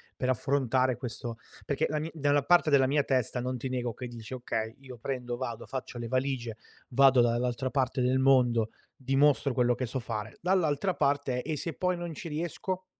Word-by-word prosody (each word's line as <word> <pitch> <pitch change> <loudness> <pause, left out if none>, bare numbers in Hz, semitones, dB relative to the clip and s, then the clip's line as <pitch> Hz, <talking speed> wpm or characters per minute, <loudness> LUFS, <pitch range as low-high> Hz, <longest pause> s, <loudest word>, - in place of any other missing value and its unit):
per 130 - -2
affrontare 130 0 +1
questo 120 -1 -6 0.3
perché 140 - 0
la 155 - -1
mi 155 +2 -3
dalla 145 -2 +2
parte 175 +2 +4
della 140 -2 +5
mia 145 +3 +3
testa 130 -2 0
non 125 +1 -2
ti 125 - -4
nego 125 -3 -2
che 125 - -6
dici: 120 0 -8
"Okay, 115 -3 -3
io 130 -2 -10
prendo, 125 0 -4
vado, 120 -3 -5
faccio 130 -2 -6
le 120 -1 -4
valigie, 130 -2 -1 0.3
vado 135 0 +5
dall'altra 120 +2 0
parte 130 -2 0
del 125 +1 +2
mondo, 125 -4 +4 0.3
dimostro 135 0 +2
quello 125 -1 +3
che 130 +1 -3
so 130 - -4
fare". 110 -2 -5
Dall'altra 180 -1 +1
parte: 140 -4 0
"E 155 +4 -3
se 165 +3 -4
poi 180 -1 0
non 175 -1 -5
ci 165 - -7
riesco?" 175 +4 -3
130 Hz, 190 wpm, -29 LUFS, 120-145 Hz, 0.3 s, della